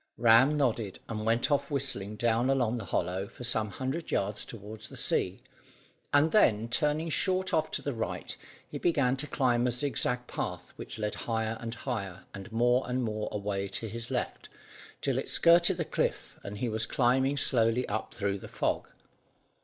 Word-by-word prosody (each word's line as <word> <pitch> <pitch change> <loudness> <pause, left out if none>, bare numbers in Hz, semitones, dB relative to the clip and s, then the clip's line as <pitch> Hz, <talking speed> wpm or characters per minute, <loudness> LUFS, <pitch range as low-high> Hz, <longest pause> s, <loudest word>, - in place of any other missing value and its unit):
Ram 120 +6 +6
nodded 115 -8 0
and 110 -1 -4
went 115 +6 +2
off 145 - +1
whistling 135 -8 -2
down 120 +3 +1
along 125 -3 +1
the 105 - -6
hollow 95 +2 -1
for 125 - -11
some 110 -3 0
hundred 130 - -4
yards 105 +1 0
toward 110 0 -9
the - - -8
sea, - - 0 0.7
and 145 +3 +4
then, 115 - +4
turning 150 +5 +1
short 185 +1 +2
off 160 -2 +2
to - - -3
the 140 - -2
right, 115 -1 -4 0.3
he - - -6
began 140 -7 +2
to 150 +2 -1
climb 125 -4 +2
a - - +1
zigzag 125 -1 0
path - - -5
which - - -8
led 105 -1 -2 0.2
higher 115 0 0
and 115 0 -5
higher 100 -8 -4
and 100 +3 -9
more 120 +3 +3
and 125 0 0
more 110 -2 -2
away 100 -1 -2
to 100 +4 -4
his 115 +2 -5
left - - -3 0.5
till - - 0
it - - -4
skirted 170 +1 +5
the 165 - -1
cliff, - - -2
and 100 +1 -6
he 125 - -1
was 110 0 0
climbing 130 +3 +2
slowly 120 -2 +3
up 110 +2 -3
through 100 -1 -1
the - - -9
fog. - - -1
120 Hz, 180 wpm, -30 LUFS, 110-135 Hz, 0.7 s, Ram